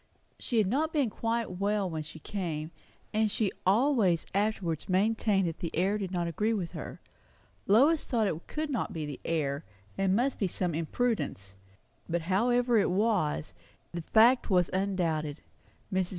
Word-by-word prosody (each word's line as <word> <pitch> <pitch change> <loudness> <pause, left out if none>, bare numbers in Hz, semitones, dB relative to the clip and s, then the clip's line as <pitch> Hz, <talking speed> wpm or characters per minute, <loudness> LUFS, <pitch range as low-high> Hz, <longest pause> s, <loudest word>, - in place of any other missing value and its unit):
She 240 - -2
had 215 - +4
not 290 - 0
been 280 -8 +1
quite 225 -5 -2
well 200 0 +1
when 160 -3 -3
she 155 +1 -9
came; 160 -3 -4 0.4
and 215 0 +2
she 205 -1 0 0.2
always 210 - +3
afterwards 195 -6 -1
maintained 200 0 +2
that 165 - -4
the 170 - -3
air 195 +5 +1
did 195 -3 -3
not 175 -2 -1
agree 210 +7 0
with 180 -5 -3
her. 165 -4 -7 0.7
Lois 280 +10 +5
thought 230 -3 0
it 165 -4 -3
could 305 -1 -3
not 250 - -2
be 155 -2 -3
the 145 -2 -6
air, 145 -4 -1 0.4
and 195 -1 +3
must 255 +4 0
be 195 - +1
some 180 -1 -2
imprudence; 165 - -2 0.6
but 170 0 -1
however 240 +6 +2
it - - +2
was, 185 - 0 0.4
the 170 - -4
fact 230 +9 +4
was 180 -3 +3
undoubted. 170 -6 -1 0.5
Mrs. 185 -1 +1
195 Hz, 165 wpm, -30 LUFS, 170-225 Hz, 0.7 s, Lois